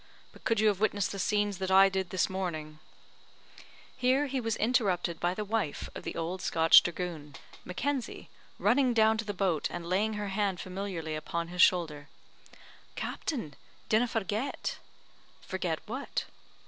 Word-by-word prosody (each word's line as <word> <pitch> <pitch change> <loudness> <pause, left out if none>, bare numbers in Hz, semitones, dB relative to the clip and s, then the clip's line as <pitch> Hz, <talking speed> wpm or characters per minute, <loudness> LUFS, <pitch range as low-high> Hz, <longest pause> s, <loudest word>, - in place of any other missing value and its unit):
But - - -18
could 225 -2 +1
you 215 - +4
have 200 -3 -1
witnessed 205 -2 +1
the 195 - -5
scenes 205 -1 0
that 190 -1 -2
I 190 +1 +7
did 190 -2 -2
this 185 0 +1
morning 155 -5 -4 0.6
" - - -20 0.3
Here 260 +2 +2
he 270 -2 -2
was 225 -2 -1
interrupted 195 -8 +1
by 175 +1 0
the 210 - -3
wife 210 -8 -2
of - - -7
the - - -5
old 175 +3 -3
Scotch 165 0 +7
dragoon, 170 -5 -5 0.3
Mackenzie, 260 +7 -3 0.3
running 255 -1 +3
down 220 0 +4
to 225 - -2
the 205 - -2
boat 185 -5 0
and 175 -1 -6
laying 200 +5 +1
her 210 -1 -3
hand 195 -2 0
familiarly 185 -4 -4
upon 170 +2 -3
his 180 0 0
shoulder, 155 -6 +3 0.9
"Captain, 230 - -4 0.4
dinna 220 +3 +3
forget." 225 +3 -2 0.6
"Forget 180 -4 -2
what?" 260 +6 -3
195 Hz, 160 wpm, -30 LUFS, 175-220 Hz, 0.9 s, I